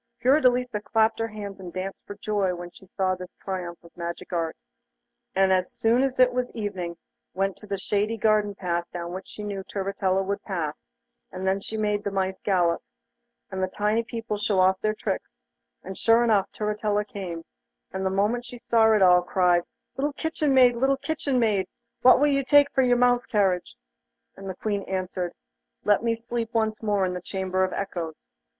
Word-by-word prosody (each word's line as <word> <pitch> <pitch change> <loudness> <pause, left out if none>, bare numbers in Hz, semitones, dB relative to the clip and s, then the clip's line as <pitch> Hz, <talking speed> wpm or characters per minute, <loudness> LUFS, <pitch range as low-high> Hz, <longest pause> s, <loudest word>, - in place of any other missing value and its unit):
Fiordelisa 250 -4 +3
clapped 220 +1 +2
her 225 - 0
hands 205 -3 -7
and 180 -2 -8
danced 190 +2 -5
for 205 - -7
joy 205 -3 0
when 175 0 -8
she 190 - -17
saw 185 0 0
this 180 0 -8
triumph 180 -3 -5
of 170 - -17
magic 170 +1 -6
art, 165 -2 -1 0.8
and 190 0 +4
as 185 -1 +1
soon 230 +3 +3
as 265 -1 0
it 255 -1 +5
was 250 0 -1
evening, 185 -6 -4 0.4
went 195 0 0
to 210 -1 -15
a 200 - 0
shady 210 +3 -1
garden 210 -1 +2
path 175 -2 -2
down 170 -1 -5
which 190 +1 -7
she 210 - -9
knew 200 -2 -4
Turritella 195 -1 -1
would 200 +1 -2
pass, 165 - -4 0.5
and 185 0 -5
then 190 +1 +1
she 220 - -5
made 210 -1 0
the 205 - -1
mice 190 -1 -1
galop, 175 -4 +2 0.7
and 190 0 -3
the 185 - +1
tiny 210 +4 0
people 230 -3 -4
show 205 -2 +1
off 185 +1 +4
their 215 0 0
tricks, - - -4 0.5
and 190 - -7
sure 230 +3 +4
enough 215 -4 +2
Turritella 210 0 -1
came, 180 -5 -6 0.5
and 190 +1 -3
the 190 - +1
moment 205 +5 +1
she 245 0 -9
saw 225 -1 +4
it 210 -3 +4
all 180 -1 +7
cried: 180 -1 +3 0.4
'Little 285 +2 0
kitchen 310 -1 -1
maid, 250 -2 +6
little 270 +2 +2
kitchen 285 -3 -1
maid, 210 -6 +2 0.3
what 255 +1 +7
will 290 - +4
you 275 -1 +2
take 285 +1 +5
for 265 - +2
your 245 -1 +4
mouse 245 0 +3
carriage?' 190 -4 +1 0.6
And 195 0 -8
the 185 - -4
Queen 205 +1 -2
answered: 185 -1 -2 0.5
'Let 205 -1 +3
me 230 0 +1
sleep 230 0 -4
once 220 -1 0
more 205 -3 +1
in 180 - -2
the 180 - -5
Chamber 190 0 -1
of 185 - 0
Echoes. 175 -5 -4
205 Hz, 195 wpm, -26 LUFS, 185-230 Hz, 0.8 s, all